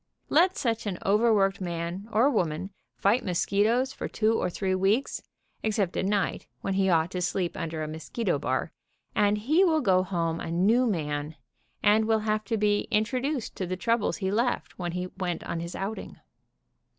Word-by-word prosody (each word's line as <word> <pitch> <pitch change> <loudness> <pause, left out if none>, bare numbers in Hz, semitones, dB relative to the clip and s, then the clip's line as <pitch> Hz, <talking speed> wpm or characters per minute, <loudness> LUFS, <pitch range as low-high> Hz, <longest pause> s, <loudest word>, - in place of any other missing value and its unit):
Let 360 +4 +4
such 230 -3 -1
an 190 -3 -2
overworked 200 -2 +3
man 175 +3 -4
or 225 +5 +4
woman 185 - 0 0.3
fight 215 +6 +2
mosquitoes 210 +8 +1
for - - -4
two 220 0 +1
or 225 - 0
three 190 +1 -1
weeks, 195 +8 +1 0.4
except 205 -4 0
at - - 0
night, 200 0 0
when 195 - -1
he 190 0 +2
ought 165 0 +2
to 180 - -3
sleep 180 0 -1
under 160 -1 -3
a - - -3
mosquito 160 +3 -2
bar, 130 +2 -1 0.4
and 205 0 +3
he 300 - +3
will 325 -4 +3
go 185 -6 +4
home 170 -3 -1
a - - -5
new 210 +9 +3
man, 150 -5 -2 0.5
and 215 +1 +5
will 220 -1 +2
have 215 0 0
to 225 +3 -1
be 205 0 +1
intro 215 +4 +1
duced 275 -2 -3
to 185 - -2
the 185 +1 -3
trou 230 +4 +2
bles 210 - -1
he 190 -2 -1
left 235 0 -1
when 175 -2 -3
he 180 0 -2
went 180 -2 -2
on 170 - -3
his 170 +1 -6
outing. 205 +3 -5
195 Hz, 185 wpm, -27 LUFS, 175-220 Hz, 0.5 s, and